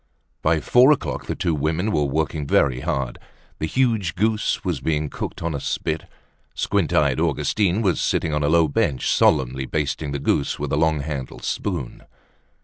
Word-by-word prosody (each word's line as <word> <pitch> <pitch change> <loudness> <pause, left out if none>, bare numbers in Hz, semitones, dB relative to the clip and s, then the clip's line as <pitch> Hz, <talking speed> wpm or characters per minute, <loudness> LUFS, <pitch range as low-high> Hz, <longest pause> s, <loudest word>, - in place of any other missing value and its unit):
By 80 0 +2
four 125 - +5
o'clock 150 - -1
the - - -2
two 85 - 0
women 80 +7 0
were 75 -5 +1
working 75 +1 -1
very 65 -3 +2
hard. 65 -1 -2 0.4
The 80 - -1
huge 110 -7 +1
goose 110 +2 0
was - - -1
being 75 -2 -1
cooked - - -5
on 85 -1 -1
a 70 - -3
spit. 80 +3 -2 0.5
Squint - - 0
eyed - - +2
Augustine 105 +1 +1
was 95 -4 +1
sitting 80 - 0
on 75 - 0
a 75 - +1
low 85 0 +4
bench 70 -2 0
solemnly 65 +1 +2
basting 75 -1 -2
the 70 - -2
goose 70 0 0
with 75 -1 -3
a - - +4
long 80 -1 +2
handled 70 -3 -6
spoon. - - -3
80 Hz, 175 wpm, -22 LUFS, 70-85 Hz, 0.5 s, four